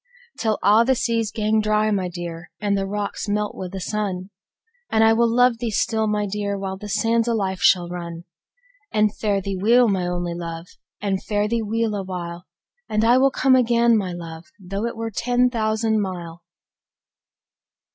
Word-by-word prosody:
Till 220 -2 +1
a1 215 +5 +5
the 265 - +4
seas 230 -2 0
gang 215 -1 +1
dry, 215 0 +1
my 190 -3 0
dear, 170 -1 -7
And 205 -1 0
the 195 0 -1
rocks 205 +1 -3
melt 210 0 -1
wi' 185 - -6
the 195 - -5
sun! 195 -1 -3 0.6
And 220 - +3
I 225 0 +6
will 235 +1 +3
luve 245 0 +3
thee 235 -1 -2
still, 220 +1 0
my 210 0 0
dear, 200 0 -2
While 190 -1 -4
the 210 +2 -8
sands 225 +2 +1
o' 235 - +1
life 190 -3 -1
shall 180 -3 +4
run. 170 -1 -6 0.7
And 210 0 +2
fare 205 -2 0
thee 195 0 -4
weel, 240 +4 +5
my 190 -4 0
only 175 -1 -2
luve, 170 0 -6 0.3
And 195 -2 -1
fare 205 0 0
thee 230 +1 0
weel 225 +1 -1
a 205 - -2
while! 175 -2 -6 0.4
And 215 +1 +1
I 245 +2 +5
will 270 +1 +5
come 260 0 +3
again, 235 -1 +4
my 190 -4 -1
Juve, 165 -1 -9
Tho' 195 +4 -3
it 235 - -6
were 225 0 -3
ten 245 +3 +1
thousand 220 -1 0
mile. 175 -3 -6
210 Hz, 185 wpm, -22 LUFS, 185-225 Hz, 0.7 s, I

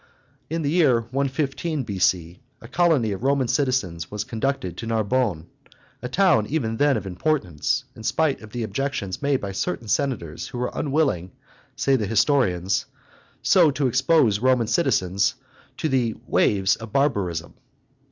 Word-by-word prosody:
In 165 +1 -2
the 145 - 0
year 145 -9 +4
115 140 +4 -2
B.C. 90 -4 0 0.2
a 115 - -12
colony 150 -6 +2
of 100 - -4
Roman 135 -1 +1
citizens 120 - -1
was 105 0 -3
conducted 115 -5 -2
to 115 - -6
Narbonne, 110 -6 0 0.6
a 125 - -5
town 155 - +3
even 115 -8 -1
then 145 -2 +3
of 100 - -5
importance, 95 - -1
in - - -11
spite 145 +5 0
of 110 - -11
the 120 +1 -4
objections 115 -6 -3
made 140 -2 +1
by 100 - -5
certain 95 +3 -3
senators 105 - -2
who - - -7
were 125 0 -2
unwilling, 135 - 0 0.4
say 135 - +2
the 105 -4 -2
historians, 105 - +1 0.6
so 175 -5 +5
to 145 0 -1
expose 130 -4 +3
Roman 125 -1 +3
citizens 100 - +1 0.4
"to - - -1
the 125 -6 0
waves 95 -1 +2
of 110 -1 -9
barbarism." 95 - 0
120 Hz, 150 wpm, -23 LUFS, 100-140 Hz, 0.6 s, so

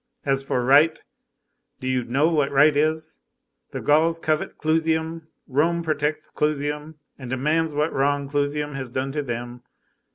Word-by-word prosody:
As 135 -1 +1
for 125 -2 -1
right, 150 +5 +5 0.8
do 130 - -5
you 130 -1 0
know 135 +6 +1
what 150 -4 +1
right 145 +2 +5
is? 155 +1 0 0.5
The - - -6
Gauls 160 +3 +3
covet 155 -1 -1
Clusium, 160 0 0 0.2
Rome 165 +5 +1
protects 155 -1 -2
Clusium, 150 +1 -2 0.2
and 130 -2 -8
demands 150 +4 0
what 150 +2 0
wrong 140 +1 +1
Clusium 145 +1 -1
has 135 -2 -5
done 130 +2 -3
to 150 +1 -2
them. 120 -2 -5
150 Hz, 150 wpm, -23 LUFS, 135-155 Hz, 0.8 s, right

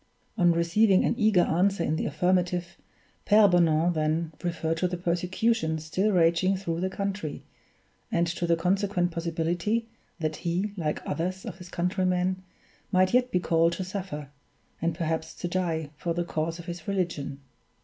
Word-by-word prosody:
On 175 -1 +4
receiving 185 +4 +3
an - - +2
eager 215 -5 +4
answer 185 +2 +1
in 155 - 0
the - - -1
affirmative, 180 -1 0 0.5
Pere 210 0 +6
Bonan 170 -2 +3
then 155 +1 0
referred 165 -2 -1
to 180 - +1
the 180 0 -3
persecution 175 +1 0
still 175 +7 0
raging 180 +1 +3
through 170 -3 -3
the 190 - 0
country, 195 -5 -4 0.7
and 170 0 +2
to 170 +1 -2
the 170 - +4
consequent 180 +1 +1
possibility 170 +6 -1 0.3
that 155 -2 -2
he, 185 +4 -2
like 155 -5 -3
others 185 +5 -2
of 190 -5 -7
his 180 -1 -10
countrymen, 185 +1 0 0.5
might 185 +1 +3
yet 250 0 +4
be 180 - +1
called 165 -1 +2
to 185 - -3
suffer, 180 -7 -5 0.5
and 165 0 0
perhaps 160 -1 -2
to 175 - -4
die, 165 -4 -2
for 170 +2 -2
the 175 0 -1
cause 165 0 -2
of 170 - -10
his 175 -2 -7
religion. 170 -8 -2
175 Hz, 160 wpm, -27 LUFS, 165-185 Hz, 0.7 s, Pere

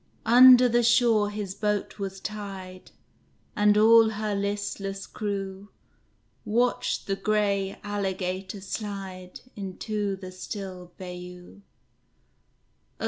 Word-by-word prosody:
Under 250 +1 +8
the 240 0 +2
shore 230 -3 +3
his 205 -2 -5
boat 210 0 -2
was 195 -1 -5
tied, 195 -3 -7 0.7
And 210 -1 +4
all 225 +1 +7
her 215 -1 -3
listless 200 -1 -3
crew 200 -1 -5 0.7
Watched 245 +3 0
the 195 - -1
gray 200 -2 0
alligator 195 -1 -3
slide 190 -2 -6
Into 200 +1 -3
the 185 -1 -9
still 185 -1 -7
bayou. 180 - -10
200 Hz, 95 wpm, -26 LUFS, 190-215 Hz, 0.7 s, Under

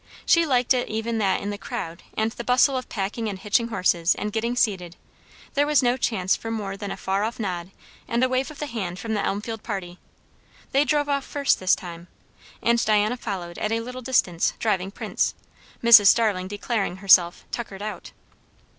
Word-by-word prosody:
She 335 -1 +4
liked 250 -1 +3
it 250 -1 -1
even 225 +1 -2
that 195 -3 +1
in 205 - -3
the 205 - -6
crowd 170 -3 -6 0.2
and 220 +1 +1
the 240 - -7
bustle 250 +3 +3
of 255 - -4
packing 215 +2 -3
and 195 - -5
hitching 210 +4 +1
horses, 180 -5 +1
and 210 0 -4
getting 235 +2 -1
seated, 185 -8 0 0.6
there 290 0 +2
was 295 -2 +3
no 245 0 +3
chance 195 -7 0
for 225 - -7
more 205 -3 -3
than 200 0 -6
a - - -5
far 195 +2 -1
off 225 +3 -3
nod 180 -4 -3 0.4
and 235 +2 +2
wave 255 +2 -1
of 305 - -11
the 295 - -3
hand 200 -9 -4
from 220 +5 -4
the 205 - 0
Elmfield 215 +2 -3
parly. 185 -5 -6 0.7
They 280 +1 +3
drove 295 -1 +1
off 280 -1 0
first 285 0 +1
this 185 0 +3
time. 170 -1 -9 0.6
And 235 0 +3
Diana 215 +2 +2
followed 185 -8 -6
at 215 - -1
a 225 0 0
little 250 +2 -7
distance, 230 -9 +1
driving 195 -4 0
Prince; 200 - -2 0.5
Mrs. 225 -3 +9
Starling 205 -5 +3
declaring 205 -1 -2
herself 185 -3 +4
"tuckered 205 -4 -5
out." 215 - -6
215 Hz, 190 wpm, -24 LUFS, 190-240 Hz, 0.7 s, Mrs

